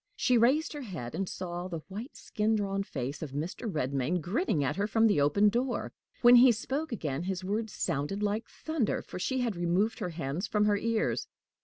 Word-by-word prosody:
She 250 - +2
raised 260 +9 +3
her 295 - -6
head, 170 - -6
and 195 -1 -2
saw 175 -1 -5
the 165 -4 -6
white, 215 +9 -7
skin 215 +1 0
drawn 195 -2 -1
face 140 -7 -4
of 150 -4 -6
Mr. 175 - -3
Redmain 140 +2 0
grinning 175 - 0
at 130 - 0
her 200 +1 0
from 225 +1 +3
the 205 -10 +4
open 150 +9 +4
door. 240 +3 -1 0.3
When 240 +1 +9
he 250 +1 +8
spoke 270 +7 -3
again, 155 - -2
his 185 -1 -3
words 215 +3 -2
sounded 170 +6 -2
like 210 +2 -1
thunder, 315 -9 -2
for - - -8
she 260 +7 0
had 235 -5 -1
removed 175 +6 +1
her 180 - -2
hands 165 +3 -3
from 210 -1 +2
her 210 -1 +3
ears. 225 +1 0
200 Hz, 200 wpm, -30 LUFS, 170-230 Hz, 0.3 s, When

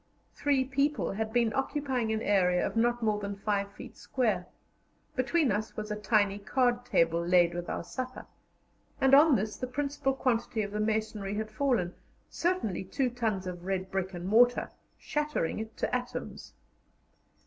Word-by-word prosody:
Three 275 -2 +1
people 280 +3 0
had 220 +2 -3
been 235 -2 +2
occupying 270 -4 -1
an 220 0 -1
area 180 -3 +3
of - - -4
not 240 +1 +2
more 210 -1 +1
than 200 -1 -4
5 200 0 -1
feet 245 +1 -10
square; 215 -9 -1 0.7
between 270 +1 +2
us 215 +2 -2
was 215 0 -4
a - - 0
tiny 205 -1 +2
card 245 +3 +1
table 165 -3 +2
laid 175 -1 +4
with 175 0 -5
our - - -3
supper, 255 +7 -6 0.7
and 270 0 +3
on 290 +1 +8
this 215 0 -2
the 255 - -3
principal 275 +1 -1
quantity 235 -4 0
of 200 - -5
the 210 - -3
masonry 215 -2 -1
had 215 0 -3
fallen 215 -7 0 0.4
certainly 345 - -1
2 250 +7 -1
tons 220 -6 -1
of 175 -1 -6
red 190 -1 -2
brick 190 -1 -1
and 175 0 -6
mortar 245 +4 +4 0.3
shattering 295 - -2
it 220 0 -7
to - - -1
atoms. 250 0 -5
220 Hz, 165 wpm, -30 LUFS, 200-255 Hz, 0.7 s, on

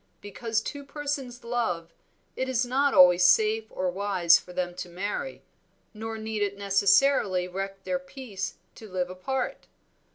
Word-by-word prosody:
Because 220 +2 -2
two 285 +5 -6
persons 280 -3 -5
love, 180 -9 -2 0.4
it 260 0 -2
is 255 -1 +1
not 270 +2 +1
always 180 -1 +7
safe 215 +4 +4
or 185 -1 -2
wise 185 -3 +4
for 180 - -13
them 180 0 -2
to 180 - -6
marry, 205 - -4 0.5
nor 225 +1 -5
need 220 -1 -4
it 200 -1 -1
necessarily 200 -1 +3
wreck 195 +1 -5
their 275 - -1
peace 260 -8 -6 0.2
to 220 - -12
live 180 -1 -2
apart. 255 +8 -3
205 Hz, 150 wpm, -27 LUFS, 185-250 Hz, 0.5 s, always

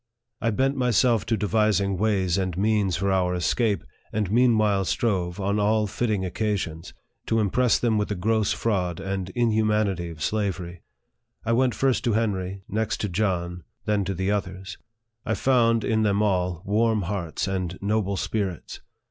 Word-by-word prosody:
I 115 - +1
bent 135 +5 +1
myself 120 -3 +2
to 115 -1 +1
devising 105 -1 +1
ways 95 -3 +1
and 95 -3 -1
means 105 -2 +1
for 100 0 0
our 90 -1 +1
escape, 100 +3 0 0.3
and 105 -3 -1
meann 120 +1 +4
lnle 105 -2 +2
strove, 90 +2 -1
on 100 +2 0
all 105 +1 +2
fitting 105 -2 -1
occasions, 95 -4 -3 0.3
to 115 - +2
impress 115 +4 +2
them 115 -3 +1
with 105 - 0
the 105 - -1
gross 110 +3 +1
fraud 90 -7 -1
and 95 -1 -3
inhumanity 105 -6 +1
of 80 -2 -7
slavery. 95 -5 -2 0.6
I 115 - +1
went 125 -1 +2
first 135 +2 +1
to 120 - +2
Henry, 100 -3 -1
next 110 +2 -1
to 105 - -1
John, 90 -2 -1 0.2
then 105 -1 +1
to 95 +1 -2
the 95 +3 -1
others. 95 -2 -4 0.4
I 110 - -1
found, 115 -2 +3
in 110 -1 +1
them 105 -1 +2
all, 90 -3 0
warm 110 +1 +2
hearts 85 -2 -3
and 90 -2 -2
noble 100 -1 0
spirits. 95 -6 -3
105 Hz, 165 wpm, -25 LUFS, 95-110 Hz, 0.6 s, meann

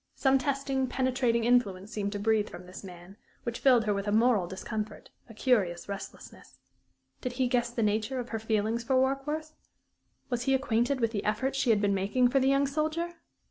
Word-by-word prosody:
Some 270 -1 +3
testing, 270 0 -1
penetrating 255 -3 +1
influence 215 -5 +1
seemed 200 -1 -2
to 205 - -3
breathe 215 0 +1
from 180 - -10
this 180 +2 -10
man, 180 +1 -11 0.3
which 235 -1 -4
filled 250 -4 +5
her 210 - +2
with 200 +1 -3
a - - +1
moral 220 -4 +3
discomfort, 210 +3 -6 0.2
a - - -10
curious 200 -9 +1
restlessness. 200 0 -9 0.6
Did 250 -2 -3
he 255 0 +1
guess 240 -1 +1
the 235 -1 -2
nature 215 +5 0
of 245 - -5
her 225 - -3
feeling 220 +1 0
for 235 +3 0
Warkworth? 275 +4 0 0.8
Was 245 0 -1
he 270 - +3
acquainted 255 0 0
with 230 -1 +2
the 205 -3 -3
efforts 260 +6 -1
she 250 - +1
had 215 -3 +4
been 200 -1 +2
making 205 +6 +2
for 270 +2 +3
the 265 0 +3
young 275 +1 +3
soldier? 315 +4 -1
235 Hz, 195 wpm, -29 LUFS, 210-265 Hz, 0.8 s, filled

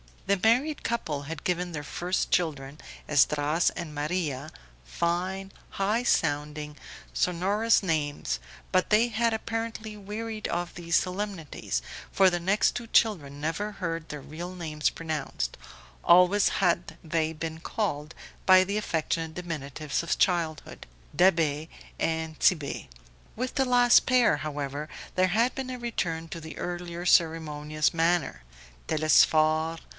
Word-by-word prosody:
The 200 0 +2
married 255 +8 +2
couple 160 -12 -2
had 155 +1 -7
given 180 -1 -1
their 150 -1 -4
first 180 +5 -2
children, 145 -4 -1 0.3
Esdras 150 +3 +3
and 160 -3 -6
Maria, 150 -2 -2 0.4
fine, 180 - -2 0.2
high 210 +5 0
sounding, 150 -5 0 0.4
sonorous 200 +6 +2
names; 145 - -1 0.3
but 185 - +2
they 220 +3 +4
had 230 +1 +1
apparently 225 -1 -4
wearied 215 +2 -5
of 175 0 -3
these 170 -1 -2
solemnities, 180 - -2 0.3
for 190 -1 +6
the 175 -1 -1
next 195 +5 +2
two 240 -1 -7
children 150 -12 +1
never 200 +7 -2
heard 165 -4 -4
their 150 -1 -7
real 175 +6 -7
names 155 -4 -1
pronounced; 155 - -4 0.5
always 180 +3 +6 0.2
had 175 -1 +1
they 160 0 0
been 160 0 -5
called 165 -5 -3 0.3
by 185 0 +7
the 200 +2 -2
affectionate 165 -4 -1
diminutives 155 -4 -3
of 170 - -1
childhood, 165 -5 -1 0.3
Da'Be 160 -3 +3 0.3
and 160 -1 -2
Tit'Bé. 150 -6 +1 0.5
With 255 +3 -3
the 270 - +2
last 245 -1 +5
pair, 250 - +4
however, 145 0 -4 0.3
there 185 0 +4
had 230 +7 +2
been 265 -1 -4
a 255 - -4
return 170 -9 -3
to 165 - -6
the 160 0 -9
earlier 175 0 -5
ceremonious 155 -3 +2
manner 165 - +1 0.4
Telesphore 155 +1 +3
170 Hz, 130 wpm, -27 LUFS, 155-195 Hz, 0.5 s, by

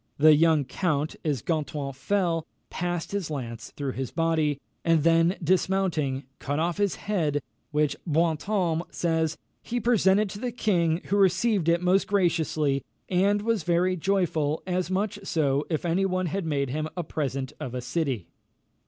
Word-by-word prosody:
The 155 +1 +7
young 155 -2 +4
count, 155 -1 -1
as 145 -7 -1
Gontran 150 -4 -2
fell, 165 +3 0 0.2
passed 175 -1 -3
his 200 -5 -2
lance 120 -6 -5
through 140 -2 -2
his 130 0 -4
body, 160 -4 +1 0.2
and 165 -3 +3
then 165 +2 +4
dismounting, 170 -6 +1 0.2
cut 145 +1 -2
off 170 +2 0
his 205 -2 +1
head, 160 -9 0 0.3
which, 150 -1 +1
Brantôme 165 +2 +1
says, 160 -2 0 0.2
"he 245 +1 -2
presented 210 -3 +3
to 200 - -7
the 245 +2 -2
king, 175 -8 +1
who 200 - +3
received 195 -1 +3
it 170 +1 +2
most 185 +2 +3
graciously, 160 -7 +1 0.3
and 200 +3 +2
was 225 -2 +1
very 175 +3 +2
joyful, 165 -5 0
as 180 -1 -1
much 200 +2 -1
so 145 -6 0
as 165 - +1
if 155 - -5
any 180 +3 +2
one 185 0 -1
had 180 +1 -2
made 140 -4 0
him 155 +2 -2
a 175 - -1
present 135 -3 -3
of 130 -5 -5
a - - -1
city." 125 - -2
165 Hz, 160 wpm, -26 LUFS, 150-190 Hz, 0.3 s, The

